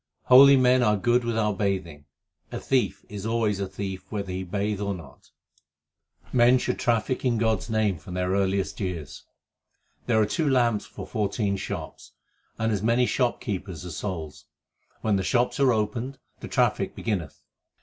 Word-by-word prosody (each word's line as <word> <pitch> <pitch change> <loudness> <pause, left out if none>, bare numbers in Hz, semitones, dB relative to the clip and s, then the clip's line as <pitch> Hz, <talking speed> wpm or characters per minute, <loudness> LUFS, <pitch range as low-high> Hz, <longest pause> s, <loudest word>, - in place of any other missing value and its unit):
Holy 135 +2 +8
men 130 0 +4
are 105 -3 +3
good 120 +4 +2
without 110 -4 -1
bathing; 90 -8 -2 0.5
a - - -4
thief 130 -2 0
is 100 -2 -7
always 110 -3 0
a 100 - -2
thief 95 0 -6
whether 100 -3 -3
he 95 +1 -3
bathe 100 +2 -2
or 100 -1 -1
not. 75 -8 -14 1.0
Men 125 +1 +5
should 125 0 -2
traffic 120 +2 0
in 125 -3 +1
God 110 -1 +2
s - - -10
name 110 -6 +1
from 90 +3 -9
their 90 0 -1
earliest 95 0 0
years: 85 - -5 0.8
There 115 -3 +3
are 110 - +4
two 150 +8 0
lamps 120 -5 +2
for - - -8
fourteen 100 -1 -1
shops, 95 - -7 0.4
2 - - -4
And 110 0 +1
as 100 - -1
many 115 +3 +3
shopkeepers 100 - -2
as 85 -4 -6
souls: 80 -7 -5 0.6
When 105 -2 +1
the 95 - -1
shops 125 +7 +1
are 135 -2 +5
opened, 115 +4 -2 0.2
the - - -7
traffic - - 0
beginneth. 95 -10 -3
105 Hz, 170 wpm, -26 LUFS, 95-120 Hz, 1.0 s, Holy